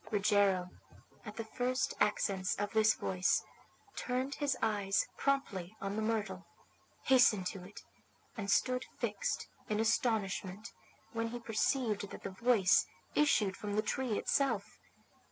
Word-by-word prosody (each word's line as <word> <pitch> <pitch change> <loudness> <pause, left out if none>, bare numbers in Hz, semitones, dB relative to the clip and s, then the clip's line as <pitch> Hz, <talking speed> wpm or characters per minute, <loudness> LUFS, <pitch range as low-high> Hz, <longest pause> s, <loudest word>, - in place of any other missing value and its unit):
Rogero, 200 -3 +2 0.6
at 210 - -7
the 225 0 -4
first 255 +4 -1
accents 195 -2 +1
of 205 0 -2
this 220 0 +4
voice, 180 -1 +1 0.5
turned 255 +2 -2
his 290 -1 -1
eyes 205 -3 +1
promptly 220 -10 -1
on 195 +1 -3
the 220 - -1
myrtle, 210 -4 -2 0.6
hastened 235 -7 +5
to 190 -3 -9
it, 200 +3 -11 0.5
and 205 -4 -4
stood 255 +3 +2
fixed 210 -4 -2 0.2
in 210 0 0
astonishment 215 -3 0 0.4
when 230 0 -1
he 240 +1 -5
perceived 225 -2 0
that - - -10
the 195 - -4
voice 200 -1 +3 0.3
issued 210 -10 +3
from 205 -1 -4
the 215 - +2
tree 245 -1 -1
itself. 235 -8 0
215 Hz, 135 wpm, -33 LUFS, 195-240 Hz, 0.6 s, hastened